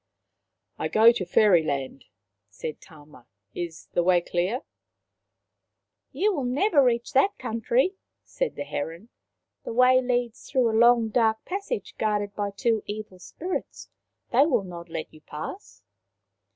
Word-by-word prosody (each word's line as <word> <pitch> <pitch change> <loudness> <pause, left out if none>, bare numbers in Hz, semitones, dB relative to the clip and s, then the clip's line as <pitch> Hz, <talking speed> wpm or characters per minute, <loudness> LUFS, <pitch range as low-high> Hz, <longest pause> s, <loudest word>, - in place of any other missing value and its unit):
" - - -55 0.3
I - - -1
go 225 +2 +6
to 195 -6 -3
Fairyland/* 160 -10 +2 0.4
said 150 +9 -7
Tama. 150 -6 -17 0.2
" 100 - -51
Is 165 -1 -12
the - - +2
way 175 0 +4
clear? 180 +8 -1 0.6
" - - -56
" - - -57 0.3
You 415 +2 +1
will 290 -7 -2
never 280 +5 +3
reach 235 +1 0
that 285 +9 +3
country/' 250 - 0 0.3
said - - -3
the - - -4
heron. 170 - -5 0.3
" - - -57
The - - -5
way 255 +1 +5
leads 245 -1 -2
through 250 -4 +2
a - - -1
long 235 -1 +5
dark 220 -1 +1
passage 400 +5 -4
guarded 210 -2 0
by 205 0 -2
two 220 +2 0
evil 205 -3 -7
spirits. 360 - -6 0.4
They 270 +5 +5
will 245 -10 +1
not 175 -2 -9
let 165 -1 -6
you 155 - -16
pass." 155 - -8
220 Hz, 155 wpm, -26 LUFS, 175-255 Hz, 0.6 s, go